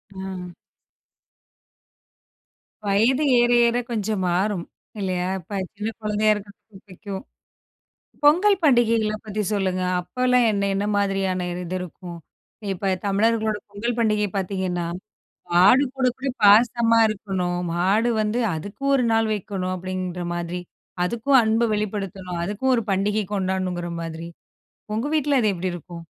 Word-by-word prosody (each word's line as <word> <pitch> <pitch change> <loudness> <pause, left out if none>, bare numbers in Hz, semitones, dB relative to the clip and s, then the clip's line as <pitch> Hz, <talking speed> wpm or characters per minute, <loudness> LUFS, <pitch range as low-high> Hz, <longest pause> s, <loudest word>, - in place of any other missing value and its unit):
ம். 190 -2 -6 2.3
வயது 235 +9 +3 0.2
ஏற 240 0 +4 0.2
ஏற 235 - +1
கொஞ்சம் 215 -3 -1
மாறும். 185 0 0 0.3
இல்லையா? 185 -2 -1
இப்ப 195 +4 -6 0.2
சின்ன 210 +2 -3
குழந்தையா 215 0 +2
இருக்றதுக்கு 205 0 -10
பிடிக்கும். 195 +3 -7 1.0
பொங்கல் 365 +7 +5
பண்டிகைகள 230 -6 +3
பத்தி 215 0 -3
சொல்லுங்க 185 -2 0 0.2
அப்பலாம் 250 +5 +2
என்ன 200 -1 0
என்ன 200 +1 -1
மாதிரியான? 195 -2 0 0.2
இது 180 +1 -4
இருக்கும். 175 -1 -8 0.5
இப்ப 190 +1 -1
தமிழர்களோட 215 +2 +1
பொங்கல் 225 +4 -3
பண்டிகை 210 -2 +2
பாத்தீங்கன்னா, 185 -2 -2 0.7
மாடு 195 +10 +6
கூட 260 -1 +1
கூட 270 +1 -3
பாசமா 230 +2 +5
இருக்கணும். 190 -4 -2
மாடு 195 +7 +2
வந்து 215 +3 0 0.2
அதுக்கு 200 - -8
1 260 - +2
நாள் 225 -1 +2
வைக்கணும், 190 -2 -3
அப்டின்ற 185 -1 -4
மாதிரி 175 +1 -3 0.5
அதுக்கும் 235 +6 +3
அன்ப 220 +1 +2
வெளிப்படுத்தணும், 195 -4 -3
அதுக்கும் 210 +8 0
ஒரு 230 - 0
பண்டிகை 205 +2 +1
கொண்டாடணுங்ற 185 -3 -2
மாதிரி 165 0 -6 0.7
உங்க 225 +5 -1
வீட்ல 290 -2 +2
அது 215 -3 +2
எப்டி 180 +1 -2
இருக்கும்? 170 0 -9
205 Hz, 120 wpm, -23 LUFS, 185-225 Hz, 2.3 s, மாடு